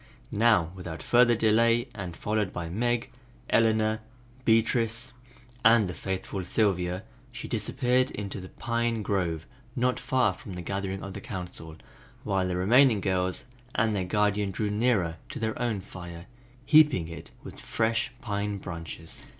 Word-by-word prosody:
Now 105 -7 +4
without 90 -3 -7
further 120 -1 +5
delay, 115 +2 +3
and 90 -5 -6
followed 105 -3 -1
by 85 -2 -5
Meg, 120 +5 0 0.4
Eleanor, 110 -1 +3 0.5
Beatrice 115 +2 +2 0.5
and 115 -2 +6
the 90 - -4
faithful 95 +1 -4
Sylvia, 90 -2 0 0.3
she 125 -1 -7
disappeared 125 +3 +1
into 100 -1 -5
the 95 - -9
Pine 115 -1 -1
grove 85 -6 -1 0.3
not 125 0 +1
far 130 -7 +2
from 95 +1 -10
the 90 - -6
gathering 95 +1 -3
of 100 - -6
the - - -7
Council, 90 -4 -6 0.5
while 95 -3 0
the 90 -1 -1
remaining 115 +4 +5
girls 95 -1 0 0.3
and 110 -1 +2
their 95 - 0
guardian 105 +2 +1
drew 105 +2 -2
nearer 105 -7 +1
to - - -6
their 110 0 -2
own 115 -5 0
fire, 85 -2 -9 0.4
heaping 150 - +5
it 85 - -9
with - - -10
fresh 115 +3 0
pine 105 -3 -2
branches. 85 -3 -8
105 Hz, 145 wpm, -28 LUFS, 90-115 Hz, 0.5 s, and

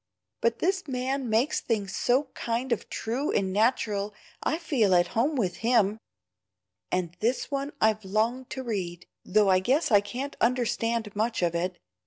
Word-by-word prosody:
But 230 0 +2
this 375 -1 0
man 260 0 -2
makes 230 +7 +2
things 205 -4 -2
so 260 +3 +1
kind 240 +2 -2
of 235 - -1
true 250 +6 -2
and 190 -2 0
natural 210 -2 +1 0.3
I 315 - 0
feel 250 - +2
at 175 0 +3
home 270 +7 +1
with 190 -9 -1
HIM. 225 -3 +2 0.9
And 180 -2 -1
this 245 +6 0
one 280 +1 -2
I've 215 0 +2
longed 225 +6 0
to 260 - -5
read, 185 -7 -4 0.2
though 205 +1 +3
I 185 - +5
guess 270 - +1
I 205 -2 +7
can't 250 +8 -5
understand 230 -3 0
much 220 -1 0
of 170 -1 +2
it. 175 +1 -2
230 Hz, 165 wpm, -27 LUFS, 200-260 Hz, 0.9 s, I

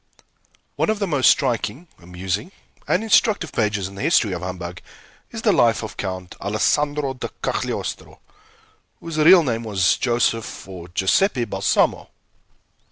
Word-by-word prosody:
One - - +1
of 215 - +1
the 205 - -1
most 145 -8 +3
striking, 130 +2 0
amusing, 95 - -4 0.4
and 195 - +1
instructive 210 -6 +2
pages 105 -4 -1
in 95 - -11
the 100 - -8
history 120 - +3
of 90 -2 -4
humbug 90 -1 -6 0.5
is - - -7
the - - +4
life - - +3
of - - -7
Count 95 -2 -5
Alessandro 145 +7 0
di 130 - -5 0.2
Cagliostro, - - -3 0.8
whose 165 -2 -5
real 170 +3 +7
name 115 -4 -2
was 100 -5 +2
Joseph 120 -2 -1
or 90 -3 -9
Giuseppe 120 - +1
Balsamo. - - 0
115 Hz, 140 wpm, -21 LUFS, 95-150 Hz, 0.8 s, real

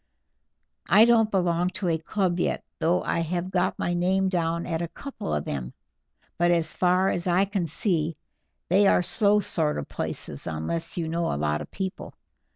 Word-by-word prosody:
I 210 +6 +8
don't 230 -2 +4
belong 175 -3 +1
to 190 -1 -2
a 165 -1 +1
club 180 +1 -1
yet, - - -1 0.2
though 175 +3 +2
I - - 0
have 175 +2 -2
got 185 0 0
my 175 - -1
name 190 +2 +1
down 170 -2 -1
at 165 -2 -2
a 170 - -2
couple 275 - -7
of 75 -1 -1
them, 65 -3 -5 0.6
but 175 0 +4
as 165 -2 +1
far 185 +1 +2
as 175 +1 -2
I 180 +2 +3
can 195 -4 -2
see 165 -1 -1 0.5
they 195 +3 +4
are 180 - +4
slow 210 +3 +3
sort 160 -5 -1
of 70 - -4
places - - -5
unless 80 - -3
you 165 -2 -1
know 165 +1 -1
a - - -2
lot 75 0 0
of - - -8
people. 190 0 -5
175 Hz, 185 wpm, -26 LUFS, 165-190 Hz, 0.6 s, I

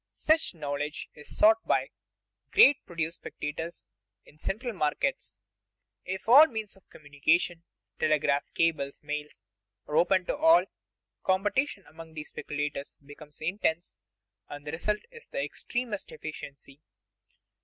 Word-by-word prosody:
Such 315 - +2
knowledge 150 -1 -4
is 150 - -9
sought 220 +1 +6
by - - +3
the - - -15 0.6
great 285 +1 +7
produce 165 -1 -3
speculators 160 - -6 0.4
in - - -18
the 155 - -19
central 235 +4 -2
markets. 165 - -1 0.7
If 190 +3 -5
all 280 +7 +10
means 220 -7 -5
of 195 - -24
communication 155 +4 0 0.4
telegraph, 145 -2 +2
cables, 150 -5 0
mails 150 -7 -5 0.4
are 150 - -3
open 180 +3 +4
to - - -1
all, 325 +3 +6 0.6
competition 200 +4 +1
among 160 +1 -12
these 150 -1 -6
speculators 145 -1 -4
becomes 145 +1 -13
intense, 170 - -1 0.5
and 145 0 -8
the 150 - -4
result 210 +7 -1
is 465 -1 -13
the - - -3
extremest 240 -5 -3
efficiency. 145 -2 -9
165 Hz, 130 wpm, -29 LUFS, 150-210 Hz, 0.7 s, all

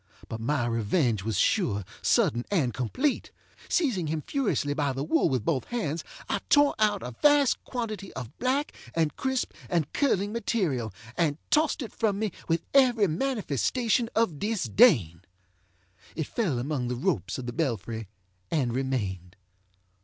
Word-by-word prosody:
But 115 - -6
my 130 +1 0
revenge 115 - +1
was 110 -2 -1
sure, 105 - +1 0.2
sudden, 120 +2 +2
and 145 - +1
complete. 250 - -1 0.4
Seizing 240 - +1
him 155 -1 -2
furiously 220 - 0
by 145 -2 0
the 135 +1 -3
wool 160 +2 +2
with 125 -5 -1
both 140 -6 0
hands, 165 -10 -2 0.2
I - - 0
tore 290 0 +5
out 210 -2 +2
a 125 - -5
vast 290 -3 +4
quantity 215 -5 -4
of 125 -4 -7
black, 265 +4 0 0.2
and 160 -3 +1
crisp, 265 -1 -1 0.2
and 165 -5 0
curling 205 -8 +1
material, 180 - -1 0.2
and 150 -4 +1
tossed 305 -2 +2
it 230 - -8
from 210 -3 0
me 215 -1 -1 0.2
with 165 0 +1
every 250 -6 +5
manifestation 230 - 0
of 200 -10 +1
disdain. 165 - +3 0.9
It 160 - -2
fell 180 - -1
among 130 0 -2
the 125 - -2
ropes 175 +9 -1
of 130 - -5
the 120 - -4
belfry 115 - -2 0.4
and 130 -7 0
remained. 100 -9 -2
160 Hz, 150 wpm, -27 LUFS, -, 0.9 s, tore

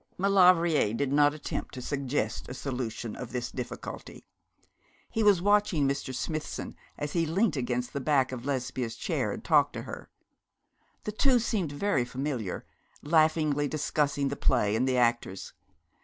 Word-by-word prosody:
Maulevrier 180 - +4
did 140 +2 -1
not 145 0 +4
attempt 150 - -5
to - - -5
suggest 135 -6 -2
a 125 - -6
solution 125 -4 -4
of 125 -2 -7
this 125 -1 -3
difficulty. 125 -2 -7 0.9
He 225 - 0
was 200 -5 +4
watching 205 -8 +3
Mr. 140 -1 -2
Smithson 155 +4 -4 0.2
as 150 0 -4
he 165 -2 +1
leant 185 +1 +1
against 125 -2 -2
the 140 - -2
back 135 -2 +2
of 125 -2 -6
Lesbia's 125 -3 -2
chair - - -1
and - - -6
talked - - +4
to - - -5
her. - - -8 0.9
The 210 - -3
two 255 +4 +3
seemed 210 -9 -1
very 145 -3 +1
familiar, 125 -5 -4 0.4
laughingly 155 -2 +3
discussing 145 -1 0
the 140 - -3
play 115 -7 +2
and 125 +4 +1
the 130 -1 +1
actors. 120 -5 0
140 Hz, 155 wpm, -29 LUFS, 125-160 Hz, 0.9 s, Maulevrier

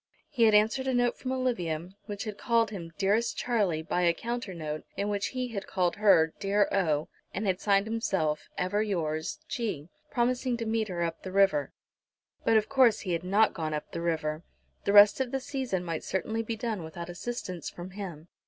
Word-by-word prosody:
He 245 -6 +3
had 215 -1 +5
answered 225 +6 +3
a 260 - +1
note 245 0 +1
from 260 - -3
Olivia, 185 -10 -1 0.2
which 205 -2 -4
had 215 -3 -5
called 230 -2 +2
him 170 -5 -7
"dearest 205 +4 +1
Charlie" 200 -10 0
by 175 +2 -1
a 170 -1 +3
counter 235 0 -4
note, 155 -2 -4
in 200 +1 -1
which 205 -1 0
he 255 -1 -3
had 205 -4 -5
called 180 -2 0
her 165 -6 +5
"dear 200 0 +2
O," 155 -6 +1 0.3
and 205 - -2
had 190 -1 0
signed 200 -1 +3
himself 190 -9 -1
"ever 195 +3 0
yours, 160 -7 -2
G," 190 - -3 0.2
promising 245 0 0
to 230 - -3
meet 220 -1 0
her 175 -3 -2
up 165 -1 -3
the 185 - -6
river. 190 -8 +3 0.7
But 225 - +4
of 215 - +1
course 260 -5 +4
he 185 -4 -2
had 165 0 -1
not 205 +4 +3
gone 155 -2 -2
up 150 - -6
the 170 - -4
river! 160 -2 -1 0.4
The 200 - +2
rest 205 +4 +8
of 260 - -1
the 270 - -1
season 260 -10 -3
might 165 -2 -3
certainly 220 +4 -1
be 225 0 -3
done 220 -5 -3
without 170 +2 -7
assistance 180 -3 -5
from 175 +2 -9
him. 180 -5 -7
200 Hz, 200 wpm, -29 LUFS, 170-230 Hz, 0.7 s, rest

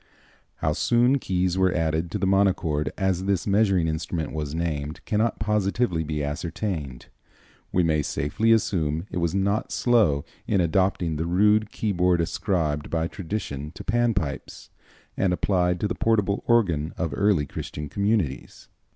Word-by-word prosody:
How - - -1
soon 125 +3 +3
keys 90 -3 0
were 95 -1 +3
added 80 0 0
to 105 - -3
the 100 - -1
monochord, 90 -7 +1
as 95 -2 0
this 100 -2 0
measuring 100 -4 +2
instrument 80 +1 -3
was 75 -1 -4
named, 80 -3 -3
cannot 110 +2 0
positively 105 -4 0
be 75 -1 -3
ascertained. 75 - -4 0.7
We 90 - +2
may 80 -2 +2
safely 75 +11 0
assume 90 -8 +1
it - - -4
was 85 +1 0
not 100 +2 0
slow 105 - +2 0.2
in 100 - +2
adopting 85 -2 +1
the 80 +2 -2
rude 105 +4 +3
keyboard 90 -4 +1
ascribed 80 -4 -1
by 80 0 0
tradition 80 -6 -5
to 100 - -8
Pan 120 +1 +1
pipes, 75 -7 -4 0.4
and 90 -2 +1
applied 90 -1 +1
to 105 - +1
the 115 - -2
portable 105 -4 +1
organ 85 -10 +2
of 85 -5 -2
early 100 -6 +2
Christian 75 +2 -6
communities. 100 -4 -2
90 Hz, 150 wpm, -25 LUFS, 80-100 Hz, 0.7 s, soon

